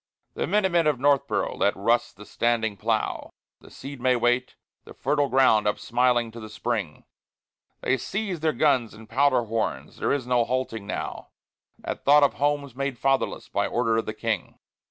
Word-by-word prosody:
The - - -2
Minute 205 -3 +2
Men 170 -2 +3
of 150 - +2
Northboro' 140 +1 +1
let 100 - +2
rust 115 +2 0
the 105 - -11
standing 115 -2 0
plough, 110 +1 -2 0.3
The - - -16
seed 140 -2 -9
may 130 0 +3
wait, 120 +1 +1 0.3
the - - -13
fertile 145 +1 0
ground 125 -5 +4
up 105 - +1
smiling 120 -1 +1
to 115 - -10
the 110 -1 -9
spring. 105 -7 -3 0.8
They 135 - +1
seize 195 - -3
their 155 0 +1
guns 130 -9 +1
and 110 +1 -13
powder 135 0 +2
horns; 115 0 -3
there - - 0
is 140 -3 0
no 125 -1 +2
halting 115 -4 -3
now, - - -5 0.6
At - - -5
thought 145 +1 +6
of 140 - +3
homes 145 -2 -1
made 135 -1 -3
fatherless 135 +2 0
by - - -1
order 115 -2 +1
of 115 - -2
the - - -4
King. - - -3
125 Hz, 180 wpm, -25 LUFS, 115-140 Hz, 0.8 s, thought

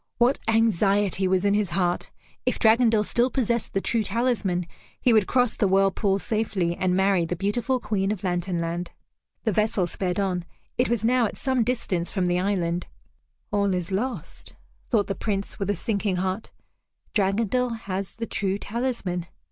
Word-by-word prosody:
What 245 +3 +3
anxiety 205 -3 +2
was 185 +1 +1
in 200 - +3
his 205 -3 +1
heart! 175 0 0 0.3
If - - 0
Dragondel 225 -1 +4
still 240 +4 +2
possessed 235 -3 -1
the 195 - +1
true 230 +2 +1
talisman, 210 -5 0 0.3
he 245 - +3
would 215 -4 +4
cross 250 -2 +2
the 205 - +2
whirlpool 195 +1 +2
safely, 200 -5 -1
and 180 0 +1
marry 190 -2 +3
the 170 +2 -2
beautiful 225 +7 0
Queen 210 -3 -1
of 210 -3 -4
Lantern 175 -1 -1
Land. 170 +1 -3 0.5
The 220 - +1
vessel 210 -2 +2
sped 180 +2 -2
on. 185 -3 0 0.3
It 250 - +1
was 230 -2 0
now 245 -1 +3
at - - -8
some 260 -3 +1
distance 210 -8 -1
from 190 -3 -1
the 180 0 +1
island. 180 -3 -1 0.6
"All 200 -2 +2
is 180 +1 -3
lost," 200 - -4 0.3
thought 215 -5 +3
the 195 - -2
Prince 200 0 -3
with 195 -1 -2
a 205 - +2
sinking 200 +1 -1
heart; 185 +3 -2 0.6
"Dragondel 225 +4 +1
has 190 -1 -4
the 230 - -3
true 195 -3 -1
talisman." 205 -6 -3
200 Hz, 170 wpm, -25 LUFS, 185-225 Hz, 0.6 s, Dragondel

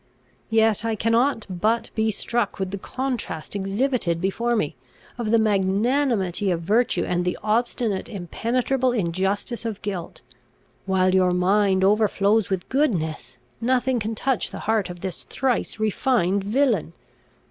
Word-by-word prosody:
Yet 220 -1 +3
I 225 -1 0
cannot 230 +2 +1
but 210 +5 0
be 220 0 +1
struck 230 +1 -1
with 190 -1 -3
the 200 - -4
contrast 245 -11 -4
exhibited 200 -2 0
before 230 +6 0
me, 155 -10 -1 0.4
of 230 -3 -2
the 230 - +5
magnanimity 205 0 +1
of 170 -2 0
virtue, 220 +8 +2
and 180 0 0
the 180 0 -1
obstinate 220 -2 0
impenetrable 240 +7 -1
injustice 195 +4 -1
of 220 -3 -4
guilt. 190 -5 -5 0.6
While 185 -1 +2
your 185 -1 +3
mind 190 +1 +2
overflows 210 0 +3
with 190 -2 -2
goodness, 185 - -1 0.2
nothing 255 +1 +1
can 220 +1 -3
touch 260 +1 0
the - - -7
heart 215 -4 +1
of 175 -1 -8
this 190 -3 -4
thrice 255 -3 -1
refined 200 -3 +1
villain. 220 - +1
210 Hz, 135 wpm, -23 LUFS, 190-235 Hz, 0.6 s, the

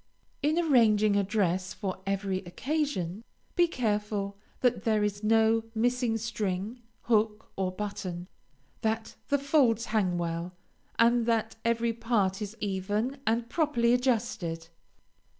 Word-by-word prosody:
In 305 +3 +2
arranging 220 -10 +4
a 200 - +3
dress 190 -1 0
for 190 -3 -4
every 195 -1 0
occasion, 210 - -2 0.3
be 350 -1 +5
careful 210 -6 -1 0.3
that 250 -1 +2
there 215 -2 +2
is 205 0 -2
no 225 +1 +4
missing 245 0 +1
string, 215 0 -3 0.2
hook, 215 -2 +1
or 190 -1 -1
button, 185 -3 -5 0.5
that 220 0 -1
the 285 - +3
folds 270 -5 +3
hang 185 -5 +2
well, 170 +1 -3 0.4
and 235 0 +4
that 225 -1 +1
every 230 0 +1
part 220 -4 0
is 210 +2 -5
even 210 +6 -1
and 230 +1 +1
properly 240 -5 +2
adjusted. 220 -10 0
220 Hz, 125 wpm, -29 LUFS, 195-235 Hz, 0.5 s, be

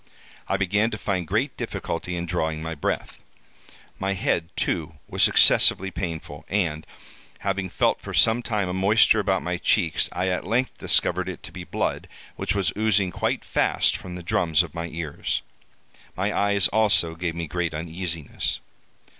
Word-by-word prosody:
I 100 - +1
began 100 +4 +2
to 105 - -4
find 95 -5 -2
great 110 - 0
difficulty 90 +2 -4
in 85 0 -3
drawing 80 -2 -2
my 80 0 -3
breath. 75 - -3 0.8
My 95 +1 0
head, 85 -3 0
too, 80 -1 -1
was - - +3
excessively 95 +1 +5
painful; 85 -4 -5
and, 85 -6 -1 0.5
having 95 -1 -1
felt - - +1
for - - -7
some 115 +2 +4
time 105 -5 -1
a 90 - -3
moisture 105 +4 +4
about 95 -2 +1
my 90 0 -1
cheeks, 85 -2 +2
I 90 +1 -1
at 90 - -1
length 125 +4 0
discovered - - +2
it - - -8
to - - -8
be - - -8
blood, - - -2 0.3
which 100 - -1
was 95 -6 +1
oozing 105 -3 +2
quite - - -1
fast - - +2
from 90 -1 -7
the 90 - -7
drums 80 -1 +2
of 85 - -9
my 85 0 -4
ears. 80 -3 -3 0.7
My 100 +3 0
eyes, 100 -2 +3
also, 105 -6 +3
gave 85 0 -3
me 85 0 -3
great 85 0 -2
uneasiness. 85 -1 -3
90 Hz, 165 wpm, -25 LUFS, 85-100 Hz, 0.8 s, excessively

